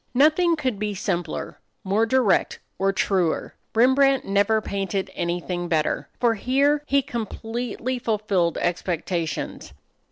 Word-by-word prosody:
Nothing 315 Hz, +5 st, +4 dB
could 255 Hz, -9 st, -2 dB
be 210 Hz, -1 st, -2 dB
simpler, 175 Hz, -3 st, -3 dB, 0.2 s
more 205 Hz, +4 st, +1 dB
direct, 250 Hz, -4 st, +2 dB, 0.2 s
or 195 Hz, 0 st, +2 dB
truer. 185 Hz, -4 st, 0 dB, 0.2 s
Rembrandt 265 Hz, +3 st, +4 dB
never 200 Hz, +3 st, +2 dB
painted 195 Hz, -2 st, -3 dB
anything 175 Hz, 0 st, -2 dB
better. 155 Hz, -2 st, 0 dB
For 240 Hz, -2 st, +3 dB
here 275 Hz, +6 st, +2 dB
he 275 Hz, 0 st, +3 dB
completely 235 Hz, +2 st, -4 dB
fulfilled 205 Hz, -8 st, 0 dB
expectations. 175 Hz, -, -2 dB
210 Hz, 115 wpm, -24 LUFS, 180-255 Hz, 0.2 s, Nothing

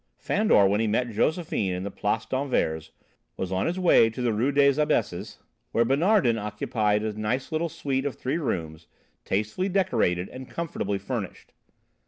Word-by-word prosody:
Fandor, 210 Hz, -, +3 dB
when 100 Hz, +2 st, +2 dB
he 115 Hz, -, +1 dB
met 115 Hz, +3 st, 0 dB
Josephine 115 Hz, -, 0 dB
in 90 Hz, +1 st, -4 dB
the 100 Hz, -, -4 dB
Place 105 Hz, +3 st, -1 dB
d'Anvers, 80 Hz, -, -1 dB, 0.5 s
was 95 Hz, -1 st, -3 dB
on 95 Hz, 0 st, 0 dB
his 175 Hz, +2 st, -2 dB
way 175 Hz, -11 st, +5 dB
to 115 Hz, -, -9 dB
the 120 Hz, -2 st, +1 dB
Rue 120 Hz, +7 st, +1 dB
des 140 Hz, +1 st, +4 dB
Abesses 105 Hz, -8 st, -1 dB, 0.4 s
where 115 Hz, -, +3 dB
Bonardin 140 Hz, -, +3 dB
occupied 105 Hz, 0 st, -1 dB
a 110 Hz, -1 st, -2 dB
nice 110 Hz, +7 st, -2 dB
little 165 Hz, +1 st, -1 dB
suite 135 Hz, -2 st, -2 dB
of 140 Hz, -, -4 dB
three 140 Hz, +6 st, -2 dB
rooms, 80 Hz, -, -4 dB, 0.4 s
tastefully 110 Hz, -, -1 dB
decorated 110 Hz, -, +1 dB
and 130 Hz, 0 st, -9 dB
comfortably 125 Hz, -12 st, -3 dB
furnished. 100 Hz, 0 st, -6 dB
115 Hz, 165 wpm, -26 LUFS, 100-140 Hz, 0.5 s, way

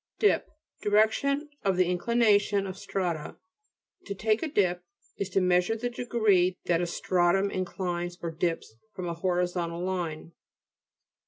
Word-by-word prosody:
DIP 420 Hz, -, +2 dB, 0.3 s
^Direction 220 Hz, +8 st, +2 dB
of 195 Hz, -2 st, +1 dB
the 185 Hz, -, +4 dB
inclination 205 Hz, +1 st, +2 dB
of 190 Hz, -1 st, -5 dB
strata. 185 Hz, -5 st, -3 dB, 0.3 s
" -, -, -38 dB
To 200 Hz, -, -4 dB
take 215 Hz, +2 st, +1 dB
a 325 Hz, -, -1 dB
dip," 180 Hz, -, +1 dB, 0.4 s
is 195 Hz, -, -2 dB
to 195 Hz, 0 st, +1 dB
mea 180 Hz, 0 st, +4 dB
sure 200 Hz, +5 st, -2 dB
the 240 Hz, +2 st, -3 dB
degree 210 Hz, -7 st, +2 dB
that 170 Hz, -1 st, +2 dB
a 175 Hz, -, -1 dB
stratum 185 Hz, +3 st, +1 dB
in 185 Hz, 0 st, -1 dB
clines 175 Hz, -1 st, -3 dB
or 170 Hz, -, -2 dB
dips 165 Hz, -6 st, -2 dB, 0.2 s
from 185 Hz, -2 st, -4 dB
a 170 Hz, -, -2 dB
horizontal 175 Hz, -1 st, -1 dB
line 170 Hz, -4 st, -3 dB
(p. -, -, -25 dB
185 Hz, 160 wpm, -28 LUFS, 175-205 Hz, 0.4 s, the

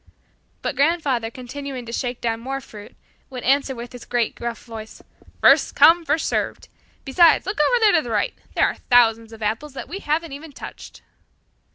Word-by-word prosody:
But -, -, -2 dB
grandfather 280 Hz, -5 st, +1 dB
continuing 255 Hz, +1 st, -7 dB
to 230 Hz, -, -8 dB
shake 245 Hz, +1 st, -3 dB
down 225 Hz, -1 st, -1 dB
more 270 Hz, +3 st, -4 dB
fruit 210 Hz, -5 st, -13 dB, 0.3 s
would 255 Hz, -2 st, -7 dB
answer 275 Hz, 0 st, +2 dB
with 240 Hz, 0 st, -8 dB
his 245 Hz, -, -9 dB
great 240 Hz, -2 st, -1 dB
gruff 235 Hz, -1 st, -6 dB
voice, 220 Hz, -2 st, -10 dB, 0.4 s
"First -, -, +5 dB
come, 335 Hz, 0 st, +6 dB
first 310 Hz, +2 st, 0 dB
served! -, -, -2 dB, 0.4 s
Besides, 330 Hz, +5 st, +5 dB
look 390 Hz, -1 st, -4 dB
over 485 Hz, +11 st, +3 dB
there 435 Hz, -2 st, +5 dB
to -, -, +4 dB
the 245 Hz, -, -8 dB
right! 230 Hz, -, 0 dB, 0.2 s
There -, -, +4 dB
are -, -, 0 dB, 0.2 s
thousands 230 Hz, -2 st, +4 dB
of 225 Hz, -1 st, -9 dB
apples 230 Hz, +8 st, -2 dB
that 270 Hz, -, -7 dB
we 390 Hz, -, -6 dB
haven't 320 Hz, -1 st, -1 dB
even 290 Hz, +2 st, -9 dB
touched!" -, -, -11 dB
260 Hz, 185 wpm, -22 LUFS, 235-300 Hz, 0.4 s, come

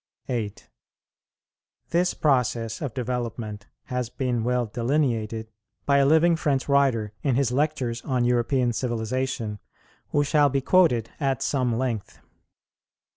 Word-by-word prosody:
"[49:1] 125 Hz, -, -1 dB
8. 105 Hz, -4 st, -5 dB, 1.2 s
This 175 Hz, +1 st, +2 dB
process 120 Hz, -5 st, +1 dB
of 140 Hz, -7 st, -4 dB
development 120 Hz, -4 st, -4 dB, 0.2 s
has 125 Hz, -3 st, -3 dB
been 125 Hz, -3 st, -1 dB
well 125 Hz, 0 st, +1 dB
delineated 115 Hz, -2 st, -1 dB, 0.3 s
by 140 Hz, 0 st, +4 dB
a 135 Hz, -, +4 dB
living 160 Hz, +3 st, +5 dB
French 145 Hz, -4 st, 0 dB
writer, 130 Hz, -7 st, +2 dB
in 135 Hz, -4 st, +1 dB
his 130 Hz, -2 st, +1 dB
Lectures 130 Hz, -4 st, 0 dB
on 125 Hz, -2 st, 0 dB
European 120 Hz, 0 st, +2 dB
civilization, 120 Hz, -1 st, -2 dB, 0.5 s
who 145 Hz, -, +2 dB
shall 145 Hz, 0 st, +3 dB
be 135 Hz, +1 st, +1 dB
quoted 135 Hz, -, +3 dB
at 135 Hz, -4 st, 0 dB
some 125 Hz, -5 st, 0 dB
length. 120 Hz, -5 st, -3 dB
125 Hz, 130 wpm, -25 LUFS, 115-140 Hz, 1.2 s, living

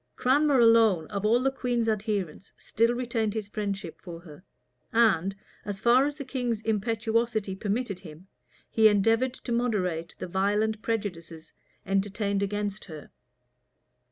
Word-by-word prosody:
Cranmer 285 Hz, +2 st, +3 dB
alone, 225 Hz, -8 st, +5 dB
of 200 Hz, 0 st, -3 dB
all 240 Hz, +3 st, +3 dB
the 270 Hz, -, +2 dB
queen's 245 Hz, -3 st, -1 dB
adherents, 205 Hz, -5 st, -2 dB
still 230 Hz, +2 st, +1 dB
retained 230 Hz, -3 st, -2 dB
his 215 Hz, -2 st, -3 dB
friendship 200 Hz, -4 st, -4 dB
for 170 Hz, -2 st, -9 dB
her; 160 Hz, -1 st, -14 dB, 0.5 s
and, 195 Hz, -5 st, +3 dB, 0.3 s
as 205 Hz, -2 st, -5 dB
far 245 Hz, +5 st, +4 dB
as 295 Hz, 0 st, -5 dB
the 280 Hz, -, -6 dB
king's 245 Hz, -4 st, -2 dB
impetuosity 220 Hz, -1 st, -1 dB
permitted 205 Hz, 0 st, -2 dB
him, 165 Hz, -1 st, -12 dB, 0.5 s
he 220 Hz, -1 st, +6 dB
endeavored 225 Hz, +5 st, +2 dB
to 245 Hz, -, -8 dB
moderate 185 Hz, -9 st, -1 dB
the -, -, -5 dB
violent 205 Hz, +4 st, 0 dB
prejudices 175 Hz, -8 st, -4 dB, 0.3 s
entertained 200 Hz, +1 st, -1 dB
against 205 Hz, 0 st, -3 dB
her. 155 Hz, -5 st, -11 dB
215 Hz, 135 wpm, -27 LUFS, 195-235 Hz, 0.5 s, he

